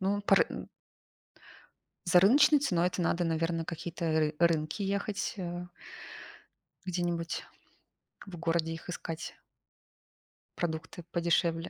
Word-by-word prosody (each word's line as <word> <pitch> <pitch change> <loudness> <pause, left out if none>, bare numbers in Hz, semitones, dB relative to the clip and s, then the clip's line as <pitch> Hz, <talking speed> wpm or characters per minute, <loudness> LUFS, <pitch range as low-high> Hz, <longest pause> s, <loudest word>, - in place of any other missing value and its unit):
Ну, 200 +2 +1
по 200 - +5
ры - - +5
м. - - -7 1.4
За 175 0 +6
рыночной 280 - +6
ценой 180 -10 +2
это 180 0 -3
надо, 175 +1 +1
наверно, 165 0 0
какие-то 165 +1 -5
р 155 -1 +2
рынки 165 +2 +2
ехать, 200 +1 -1
э. 175 -1 -4 1.2
Где-нибудь 175 -2 -2 0.8
в 190 -3 -9
городе 165 -1 0
их 165 - -8
искать. 165 -2 -5 1.2
Продукты 160 0 -4
подешевле, 170 0 +1
170 Hz, 115 wpm, -31 LUFS, 165-180 Hz, 1.4 s, За